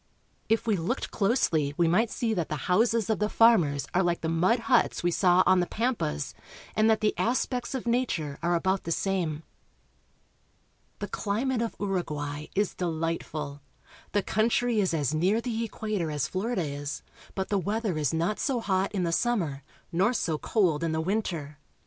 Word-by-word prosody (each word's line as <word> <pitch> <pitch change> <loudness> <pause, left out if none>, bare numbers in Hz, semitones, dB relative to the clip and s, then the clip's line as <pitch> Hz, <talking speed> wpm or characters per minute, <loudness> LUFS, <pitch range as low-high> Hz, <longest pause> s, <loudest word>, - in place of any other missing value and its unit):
If 225 0 +2
we 215 -3 +2
looked 180 +11 -2
closely 165 - +1
we 170 - +3
might 210 +8 +3
see 225 -1 -1
that 175 -6 -2
the 155 - -1
houses 225 +3 +2
of 220 - 0
the 210 0 +1
farmers 175 -14 +4
are 180 - +3
like 175 -2 0
the 160 - -1
mud 185 +9 +2
huts 225 - +2
we 175 - +2
saw 180 +1 +4
on 185 - +5
the 175 - +1
pampas, 220 - -2 0.4
and 215 +1 +4
that 220 0 +3
the 215 - +2
aspects 250 +2 0
of 255 - -4
nature 230 - -1
are 175 +1 +1
about 190 +3 0
the 165 - -3
same. 170 -4 -1 1.5
The - - -4
climate 230 +4 -1
of 230 - -2
Uruguay 150 -7 -3
is 205 0 +1
delight 165 -1 -2
ful. 145 -2 -6 0.5
The 205 - +2
country 230 +2 +1
is 190 -3 +2
as 150 -2 0
near 185 +8 +2
the 230 -1 -2
equa 215 -1 -3
tor 165 -2 -1
as 145 -6 -1
Florida 195 - -1
is, 145 0 -5 0.3
but 190 -1 -2
the 200 - +2
weather 210 0 -1
is 150 -3 0
not 170 +6 0
so 265 -4 0
hot 195 -3 0
in 190 -3 0
the 170 - 0
summer, 170 - 0 0.3
nor 190 +7 +2
so 160 -9 -1
cold 170 -8 +1
in 165 -1 0
the 160 - 0
winter. 165 -6 -2
190 Hz, 185 wpm, -28 LUFS, 160-220 Hz, 1.5 s, on